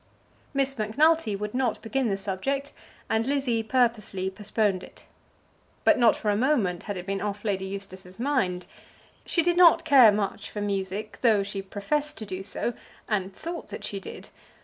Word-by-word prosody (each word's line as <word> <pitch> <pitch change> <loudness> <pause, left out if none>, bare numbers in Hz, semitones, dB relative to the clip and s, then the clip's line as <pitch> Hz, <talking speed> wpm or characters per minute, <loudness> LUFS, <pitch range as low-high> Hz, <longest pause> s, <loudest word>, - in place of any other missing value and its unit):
Miss 275 0 +1
Macnulty 250 +2 +2
would 210 +1 -4
not 250 -3 0
begin 250 +1 0
the 195 - 0
subject, 270 +9 -3 0.3
and 225 +2 0
Lizzie 270 -5 +1
purposely 220 -5 0
postponed 205 -1 0
it. - - -13 0.8
But - - +5
not 235 -3 +5
for 210 - -1
a - - +1
moment 215 - +1
had 200 - -2
it 180 - -6
been 195 0 -2
off 205 +1 -4
Lady 190 -2 -1
Eustace's 190 -1 -8
mind. 235 -9 0 0.6
She 340 - +2
did 350 +1 +2
not 340 -2 +7
care 265 -8 +8
much 205 -1 -2
for 210 - -6
music, 200 +1 -3
though 220 -5 +4
she 195 0 -4
professed 285 +11 -2
to 220 - -5
do 185 -1 -5
so, 210 +4 -3 0.3
and 195 -3 -1
thought 335 - -7
that 210 - -8
she 200 - -3
did. - - -9
210 Hz, 170 wpm, -26 LUFS, 195-260 Hz, 0.8 s, care